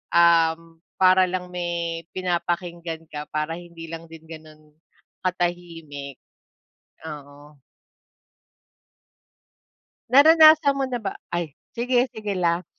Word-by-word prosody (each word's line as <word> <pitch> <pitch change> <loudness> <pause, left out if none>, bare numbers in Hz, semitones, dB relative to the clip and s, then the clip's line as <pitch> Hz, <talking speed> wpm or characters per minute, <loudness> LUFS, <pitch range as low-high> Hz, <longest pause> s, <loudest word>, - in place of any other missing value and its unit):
um, 165 -1 +3 0.2
para 185 0 +5
lang 180 0 -4
may 170 -1 -3
pinapakinggan 170 -2 -3
ka, 150 0 -6
para 155 +2 -2
hindi 170 -1 -11
lang 165 0 -8
din 165 -1 -13
gano'n 155 -1 -13 0.5
katahimik. 170 -6 -4 0.9
Oo. 145 0 -12 2.5
Naranasan 310 +1 +7
mo 270 - 0
na 245 -2 -3
ba 195 - -3 0.2
ay 170 -3 -3 0.2
sige, 245 +1 +1
sige 220 -4 -6
lang. 175 -1 0
170 Hz, 100 wpm, -23 LUFS, 160-185 Hz, 2.5 s, Naranasan